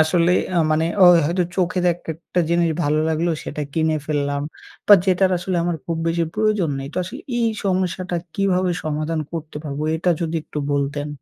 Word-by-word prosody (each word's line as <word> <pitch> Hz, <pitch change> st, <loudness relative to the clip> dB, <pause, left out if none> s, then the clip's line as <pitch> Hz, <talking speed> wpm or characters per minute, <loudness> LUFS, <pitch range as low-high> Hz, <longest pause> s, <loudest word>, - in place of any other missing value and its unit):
আসলে 170 Hz, +2 st, +2 dB, 0.4 s
মানে 155 Hz, +1 st, +2 dB, 0.2 s
ও -, -, +9 dB, 0.2 s
হয়তো 175 Hz, +3 st, +1 dB
চোখে 185 Hz, 0 st, 0 dB, 0.2 s
একটা 165 Hz, +1 st, -4 dB
জিনিস 170 Hz, -1 st, +2 dB
ভালো 150 Hz, +1 st, +2 dB
লাগলো, 160 Hz, +2 st, 0 dB
সেটা 150 Hz, -, -4 dB
কিনে 160 Hz, 0 st, +1 dB
ফেললাম। 145 Hz, -2 st, -1 dB, 0.4 s
বা 205 Hz, -, +10 dB
যেটার 190 Hz, 0 st, +3 dB
আসলে 180 Hz, +1 st, -2 dB
আমার 175 Hz, -1 st, -1 dB
খুব 165 Hz, -, -2 dB
বেশি 165 Hz, 0 st, +1 dB
প্রয়োজন 210 Hz, -6 st, +1 dB
নেই। 135 Hz, 0 st, -5 dB
তো -, -, -12 dB
আসলে 180 Hz, -, -7 dB, 0.2 s
এই 230 Hz, -1 st, +2 dB, 0.2 s
সমস্যাটা 185 Hz, -1 st, -1 dB, 0.2 s
কিভাবে 185 Hz, -2 st, +1 dB
সমাধান 155 Hz, +1 st, -2 dB
করতে 160 Hz, -2 st, -6 dB
পারব, 145 Hz, -1 st, -4 dB, 0.2 s
এটা 175 Hz, +2 st, +1 dB
যদি 165 Hz, -1 st, -1 dB
একটু 150 Hz, -, -7 dB
বলতেন? 145 Hz, +1 st, -1 dB
170 Hz, 170 wpm, -21 LUFS, 155-180 Hz, 0.4 s, বা